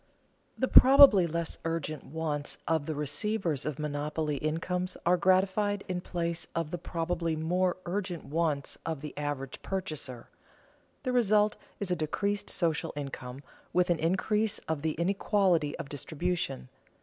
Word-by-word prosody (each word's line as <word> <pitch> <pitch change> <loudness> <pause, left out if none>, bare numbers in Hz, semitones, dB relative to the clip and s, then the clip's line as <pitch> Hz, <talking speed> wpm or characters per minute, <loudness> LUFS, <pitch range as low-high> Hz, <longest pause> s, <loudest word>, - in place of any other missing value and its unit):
The 260 - +1
probably 260 -11 +8
less 170 0 -3
urgent 160 -3 -3
wants 150 -1 -3
of 160 -3 +1
the 155 - -2
receivers 155 +1 -1
of 150 - -3
monopoly 150 0 -2
incomes 180 +5 -2
are 175 +1 +5
gratified 190 +3 +2
in 180 -1 -2
place 170 -1 -3
of 165 -2 -2
the 175 - -3
probably 165 -1 -2
more 180 +4 0
urgent 180 -2 -3
wants 150 -2 -1
of 160 -4 -3
the 150 -1 -7
average 145 -2 -4
purchaser. 155 -10 -4 0.8
The 255 - -1
result 215 -3 +3 0.2
is 200 -3 -3
a - - +3
decreased 200 +6 -1
social 165 -3 0
income, 135 -2 -6 0.3
with 180 0 +3
an 170 - +1
increase 210 +5 +1
of 160 -2 -1
the 155 0 0
inequality 180 -2 +1
of - - -6
distribution. 155 - -3
165 Hz, 140 wpm, -30 LUFS, 150-185 Hz, 0.8 s, probably